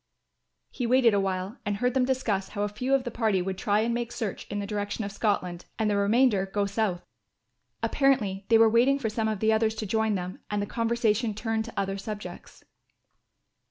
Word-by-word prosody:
He 245 - -3
waited 245 -2 +5
awhile 195 +2 -1
and 205 -1 -2
heard 250 +3 +1
them 260 -1 +2
discuss 235 -7 -1
how 205 -1 -3
a 205 - 0
few 250 +6 0
of 270 - 0
the 240 - -4
party 220 -4 +1
would 190 +1 -2
try 205 0 +2
and 235 +1 0
make 240 0 -2
search 225 -5 -4
in 205 - -4
the 200 - -2
direction 205 +1 -3
of 200 - -4
Scotland 185 -5 -1
and 220 -2 +1
the - - +1
remainder 200 0 +3
go 200 +1 0
south. 200 -3 -1 0.8
Apparently 225 -9 +1
they 225 - +7
were 225 0 +6
waiting 240 +5 +4
for 225 -6 -2
some 220 0 -1
of 215 -3 -2
the 220 0 +3
others 220 0 +1
to 220 - -4
join 220 +1 +1
them 180 0 -5
and 210 - -1
the 205 - -1
conversation 230 0 0
turned 220 0 -2
to 235 - -5
other 195 0 -2
subjects. 210 +1 -8
215 Hz, 205 wpm, -27 LUFS, 200-235 Hz, 0.8 s, they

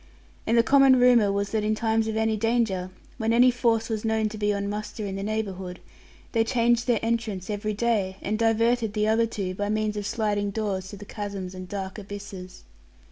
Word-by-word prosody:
And 230 +2 +3
the 230 - +6
common 270 0 +6
rumour 240 -5 +5
was 200 0 -1
that 220 -1 0
in 215 +1 +1
times 220 0 +1
of 220 0 -2
any 220 0 +1
danger, 220 -4 0 0.3
when 225 0 +1
any 245 +2 +6
force 230 -2 +1
was 220 -2 -3
known 220 -1 +1
to 215 - -8
be 210 0 +1
on 200 0 -2
muster 210 +1 -4
in 195 - -4
their 195 0 -4
neighbourhood, 195 -4 -4 0.5
they 225 -1 +2
changed 235 0 +1
their 240 -2 +3
entrance 220 -4 -2
every 210 0 -2
day, 205 -4 0
and 215 +2 -2
diverted 230 0 +2
the 210 0 +1
other 225 +1 +3
two, 195 -4 -4
by 205 +2 -3
means 215 0 0
of 205 -1 -3
sliding 205 -3 0
doors 200 -3 -2
to 205 - -9
the 205 - -10
chasms 200 -3 -6
and 185 -1 -8
dark 195 0 -5
abysses. 200 -2 -9
215 Hz, 205 wpm, -26 LUFS, 200-225 Hz, 0.5 s, the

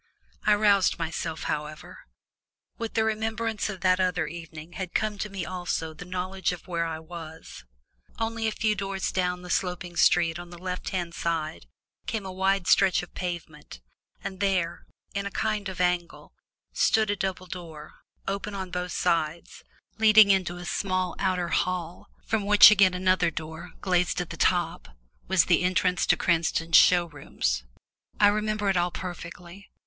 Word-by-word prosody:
I 210 - +6
roused 205 -2 +3
myself, 160 -1 -4
however. 150 0 -5 0.8
With 230 -1 -4
the 220 - +3
remembrance 220 0 -1
of 190 -3 -6
that 185 0 +3
other 180 -3 +1
evening 165 0 -9
had 185 -1 -6
come 215 -2 0
to 210 - -3
me 195 -3 -5
also 175 -3 -3
the 155 +3 -10
knowledge 185 0 -2
of 180 0 -8
where 170 -2 -1
I 160 -1 -4
was. 160 - -10 0.5
Only 225 0 -1
a - - 0
few 215 0 0
yards 195 -1 -3
down 180 -1 -1
the 180 - -6
sloping 180 -1 -2
street 170 -1 +3
on 175 0 -9
the 175 - -10
left 180 +1 -4
hand 175 -3 -3
side 160 -2 -3 0.4
came 220 -3 -3
a 190 - -5
wide 190 0 +1
stretch 190 -1 +4
of 175 - -12
pavement, 170 - -6 0.4
and 190 -1 -6
there, 185 -4 -1 0.3
in 200 0 -2
a - - -3
kind 210 -1 -2
of 185 - -8
angle, 180 -1 -1 0.4
stood 220 -2 +3
a - - 0
double 190 -2 -3
door, 165 -4 -9 0.3
open 200 +1 -3
on 190 -2 -5
both 180 -1 -3
sides, 165 -1 -1 0.4
leading 215 -2 +7
into 185 -2 +1
a 175 - -8
small 185 0 -1
outer 180 -2 0
hall, 180 -1 -2 0.2
from 220 -2 0
which 210 0 +9
again 190 -3 +5
another 185 -2 +2
door, 160 +2 -7
glazed 180 -2 +1
at 175 - -4
the - - -5
top, - - 0 0.3
was 190 -2 +4
the 175 -2 +3
entrance 180 0 +1
to - - +4
Cranston's 165 -1 +1
show 175 -1 +7
rooms. 60 - -3 0.5
I 205 - +7
remembered 215 -1 0
it 190 - 0
all 175 0 +2
perfectly. 175 +1 -8
180 Hz, 165 wpm, -27 LUFS, 170-195 Hz, 0.8 s, which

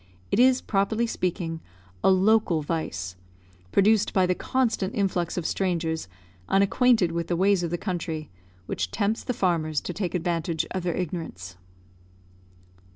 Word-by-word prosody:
It - - +2
is, 255 +1 +5
properly 215 +3 +1
speaking, 175 -6 -2 0.4
a - - +5
local 190 -3 +3
vice, 100 - -3 0.6
produced 210 +1 +3
by 190 -1 +4
the 180 - +2
constant 230 -3 -1
influx 185 -4 0
of 175 - -2
strangers 165 - -1 0.4
unacquainted 200 -1 +3
with 170 0 -2
the 175 - 0
ways 195 +1 +3
of 170 - -2
the 175 - -1
country, 165 -4 -4 0.3
which 90 -1 -2
tempts 205 - -1
the 250 - -2
farmers 160 -6 +1
to 180 - -5
take 180 -1 -3
advantage 170 -2 -1
of 185 - -2
their 175 -1 -1
ignorance. 155 - -5
180 Hz, 145 wpm, -26 LUFS, 165-200 Hz, 0.6 s, is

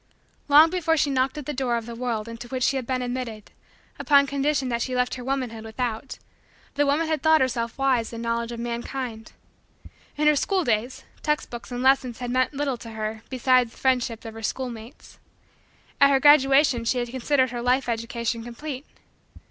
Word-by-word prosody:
Long 305 +3 +7
before 330 -3 +1
she 290 -1 +1
knocked 260 +1 0
at 295 - -6
the 295 - -3
door 250 -3 0
of 230 - -5
the 235 - -7
world 230 -2 -3
into 230 +1 -8
which 255 0 -3
she 275 - +2
had 255 -3 -3
been 255 -1 -1
admitted, 245 -4 -5 0.5
upon 280 -1 +5
condition 280 0 0
that 235 -1 -1
she 255 +1 -2
left 250 0 +1
her 250 - -6
womanhood 250 -4 -3
without, 225 +2 -4 0.6
the 290 0 +1
woman 295 +4 +2
had 315 -1 -1
thought 315 0 +5
herself 235 -3 -1
wise 260 -4 +1
in 230 - -7
knowledge 230 0 -2
of 235 - -6
mankind. 235 -1 -5 0.8
In 300 - +1
her 300 0 +5
school 375 +5 +1
days, 235 0 -1 0.2
text 300 0 -1
books 240 +1 -8
and 245 +1 -3
lessons 260 -3 +3
had 245 -1 -4
meant 255 +1 +1
little 275 -3 -1
to 230 - -10
her 215 0 -4
beside 255 -1 +3
the - - -19
friendship 250 -4 0
of 225 - -7
her 225 - -9
schoolmates. 240 +1 -6 0.8
At 280 - +7
her 275 -1 +4
graduation 270 -3 +5
she 235 +2 0
had 240 -1 -2
considered 260 +1 +1
her 240 -1 -4
life 250 +2 +1
education 230 0 -2
complete. 260 +4 -7
255 Hz, 195 wpm, -24 LUFS, 235-275 Hz, 0.8 s, Long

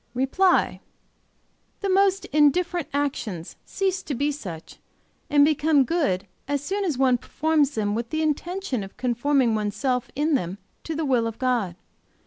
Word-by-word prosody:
"REPLY. 310 +9 +2 1.0
The 400 - -1
most 390 0 +3
indifferent 330 +3 +3
actions 250 - -3
cease 385 -1 -1
to 285 - -4
be 285 +4 0
such, 180 - -8 0.5
and 290 -1 +6
become 300 -1 +3
good 235 - 0 0.2
as 285 0 -1
soon 400 +6 -2
as 325 -9 -1
one 255 -2 +3
performs 300 +1 +1
them 205 -1 0
with 230 +1 -3
the 315 +3 -1
intention 310 - -2
of 195 - -11
conforming 250 0 +1
one's 210 -1 -1
self 250 +2 -1
in 300 +3 +1
them 190 -8 -1 0.3
to 325 - -3
the 320 0 -1
will 245 -4 +2
of 225 0 -6
God. 240 -9 0
280 Hz, 155 wpm, -24 LUFS, 235-315 Hz, 1.0 s, and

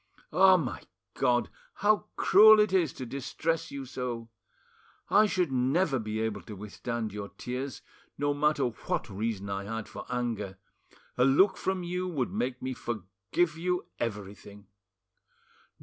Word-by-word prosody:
Ah, 185 +2 +7
my 125 - -3 0.3
God! 120 0 +1 0.2
how 210 +1 +2
cruel 215 +3 +8
it 210 -2 +3
is 175 -7 +3
to 130 - -6
distress 160 +6 -2
you 140 -1 -6
so! 120 -3 -5 0.8
I 210 +1 +6
should 180 -7 0
never 135 +3 +2
be 110 0 -3
able 110 -3 -2
to 105 - -8
withstand 110 +2 -4
your 100 -1 -5
tears; 130 +2 -5 0.3
no 145 0 +1
matter 145 -1 +2
what 115 -1 -3
reason 100 0 -3
I 100 0 -3
had 115 +1 -4
for - - -9
anger, 115 -6 -2 0.6
a - - +6
look 185 +9 +5
from 190 -1 -2
you 180 +1 -2
would 145 -9 -2
make 125 0 -2
me 130 0 -2
forgive 110 - -2
you 180 +1 -1
everything." 105 -2 -6
125 Hz, 145 wpm, -29 LUFS, 110-170 Hz, 0.8 s, cruel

